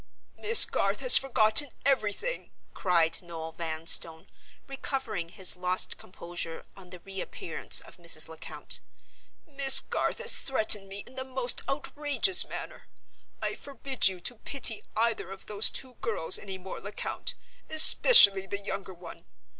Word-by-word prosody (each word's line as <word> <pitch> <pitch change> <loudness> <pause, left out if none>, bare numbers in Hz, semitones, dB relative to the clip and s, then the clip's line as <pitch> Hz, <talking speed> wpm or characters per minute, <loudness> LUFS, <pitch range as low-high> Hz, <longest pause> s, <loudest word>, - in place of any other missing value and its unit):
"Miss 455 +2 +6
Garth - - -3
has - - +8
forgotten 255 +1 +4 0.2
everything," 275 - -3 0.2
cried 170 -3 -1
Noel 165 -2 -10
Vanstone, 160 0 0 0.4
recovering 265 -10 -6
his 185 0 +1
lost 180 +1 -3
composure 170 -2 -9
on 185 -2 -15
the 180 0 -13
re 195 0 -9
appearance 165 - -2
of - - -16
Mrs. 170 -2 0
Lecount. 160 0 -5 0.7
"Miss 275 -3 +6
Garth - - -4
has 475 0 0
threatened 215 -6 +1
me 200 +1 -9
in 250 - -18
the 260 - -7
most 260 -2 -1
outrageous 295 +5 +1
manner. - - -11 0.6
I - - -3
forbid 275 - -2
you 190 -2 -4
to 245 +6 -4
pity 230 -3 -1 0.2
either 230 -4 -2
of 195 0 -11
those 210 0 0
two 260 -1 -6
girls 210 -8 -1
any 190 -2 -9
more, 185 0 -11
Lecount—especially 205 - +4
the 200 +1 -7
younger 195 -2 -8
one. 170 0 -15
205 Hz, 140 wpm, -26 LUFS, 180-270 Hz, 0.7 s, has